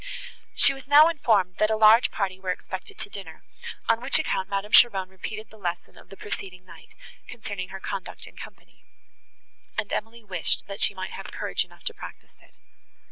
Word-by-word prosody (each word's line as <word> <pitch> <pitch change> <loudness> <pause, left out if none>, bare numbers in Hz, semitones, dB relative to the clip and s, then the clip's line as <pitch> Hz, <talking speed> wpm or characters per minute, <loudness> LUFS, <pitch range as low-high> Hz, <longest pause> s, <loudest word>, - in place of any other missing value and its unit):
She 275 - +5
was 270 -1 -11
now 295 +3 +8
informed, 220 - +2
that 215 - +4
a 220 - +2
large 220 +2 +7
party 190 -2 -2
were 190 -1 -5
expected 185 +1 -5
to - - -4
dinner, 200 -1 -9 0.4
on 230 0 +3
which 260 +3 +2
account 190 -11 -1
Madame 200 +1 -2
Cheron 195 -6 +6
repeated 210 +3 -7
the 220 - -15
lesson 175 -2 -4
of - - -17
the 195 - -12
preceding 185 -2 -7
night, - - -15 0.3
concerning 205 -6 -6
her 190 0 -7
conduct 195 -1 -6
in - - -14
company, - - -13 0.9
and 210 -1 -2
Emily 225 +2 -4
wished 185 -5 0
that 200 +1 -7
she 200 - +3
might 185 0 -5
have - - -8
courage - - -1
enough - - -19
to 460 - -3
practise - - -11
it. - - -24
205 Hz, 190 wpm, -26 LUFS, 190-225 Hz, 0.9 s, now